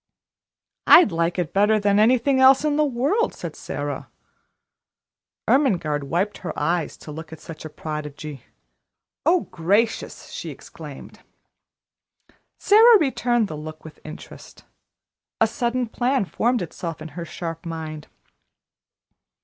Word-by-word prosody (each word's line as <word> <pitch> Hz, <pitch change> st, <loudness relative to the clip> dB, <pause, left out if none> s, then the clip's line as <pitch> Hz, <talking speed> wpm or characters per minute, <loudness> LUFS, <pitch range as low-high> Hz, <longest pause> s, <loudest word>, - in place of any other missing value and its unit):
"I'd 340 Hz, -, +8 dB
like 170 Hz, +1 st, 0 dB
it 175 Hz, -4 st, -2 dB
better 210 Hz, +2 st, +3 dB
than 200 Hz, 0 st, +2 dB
anything 255 Hz, +4 st, +3 dB
else 265 Hz, +2 st, +6 dB
in 295 Hz, -1 st, +1 dB
the 305 Hz, -, +3 dB
world," 285 Hz, -, 0 dB
said -, -, -7 dB
Sara. -, -, -5 dB, 1.4 s
Ermengarde 170 Hz, -, +2 dB
wiped 185 Hz, +7 st, -1 dB
her 180 Hz, -, -6 dB
eyes 170 Hz, -1 st, -1 dB
to 150 Hz, -, -10 dB
look 160 Hz, +1 st, -9 dB
at 160 Hz, -, -9 dB
such 160 Hz, -1 st, -10 dB
a -, -, -6 dB
prodigy. 150 Hz, -3 st, -7 dB, 0.8 s
"Oh, 350 Hz, +1 st, +4 dB
gracious!" 200 Hz, +7 st, 0 dB
she -, -, -6 dB
exclaimed. -, -, -11 dB, 1.4 s
Sara 445 Hz, +2 st, +7 dB
returned 240 Hz, -, +1 dB
the 155 Hz, -, -6 dB
look 155 Hz, +1 st, -9 dB
with 155 Hz, -, -12 dB
interest. 155 Hz, -, -12 dB, 0.7 s
A -, -, +5 dB
sudden 245 Hz, -1 st, -1 dB
plan 245 Hz, +1 st, 0 dB
formed 240 Hz, +3 st, 0 dB
itself 165 Hz, -1 st, -6 dB
in 155 Hz, +1 st, -8 dB
her 170 Hz, +3 st, -7 dB
sharp 165 Hz, -1 st, -6 dB
mind. 160 Hz, -2 st, -6 dB
190 Hz, 125 wpm, -23 LUFS, 160-255 Hz, 1.4 s, I'd